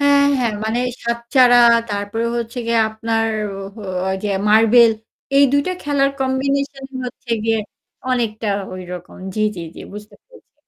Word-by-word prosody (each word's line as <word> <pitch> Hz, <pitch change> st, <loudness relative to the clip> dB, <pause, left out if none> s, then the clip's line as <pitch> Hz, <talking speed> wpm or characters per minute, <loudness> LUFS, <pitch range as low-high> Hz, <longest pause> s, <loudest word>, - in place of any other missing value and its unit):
হ্যাঁ, 285 Hz, 0 st, +4 dB
হ্যাঁ। 240 Hz, -3 st, 0 dB
মানে 220 Hz, +2 st, -1 dB, 0.3 s
সাত-চাড়া, 235 Hz, +1 st, +3 dB, 0.3 s
তারপরে 205 Hz, +3 st, -2 dB
হচ্ছে 235 Hz, +1 st, -4 dB
গিয়ে 230 Hz, 0 st, +2 dB
আপনার 225 Hz, +1 st, -1 dB, 0.3 s
ও -, -, -7 dB, 0.2 s
হো 215 Hz, -, -9 dB, 0.3 s
ওই 190 Hz, -, 0 dB
যে -, -, 0 dB, 0.2 s
মার্বেল, 225 Hz, +2 st, +6 dB, 0.4 s
এই 280 Hz, -, +7 dB
২ 285 Hz, -, +4 dB
টা 370 Hz, -, 0 dB
খেলার 280 Hz, -2 st, +1 dB
কম্বিনেশনই 270 Hz, +1 st, -2 dB
হচ্ছে 245 Hz, 0 st, -10 dB
গিয়ে 225 Hz, 0 st, +2 dB, 0.5 s
অনেকটা 225 Hz, -3 st, -1 dB, 0.3 s
ওইরকম। 180 Hz, -1 st, -9 dB, 0.2 s
জি, 215 Hz, -, -2 dB, 0.2 s
জি, 170 Hz, -, -5 dB
জি। -, -, -10 dB
বুঝতে 210 Hz, +1 st, -10 dB
পেরেছি। -, -, -21 dB
235 Hz, 150 wpm, -19 LUFS, 220-270 Hz, 0.5 s, এই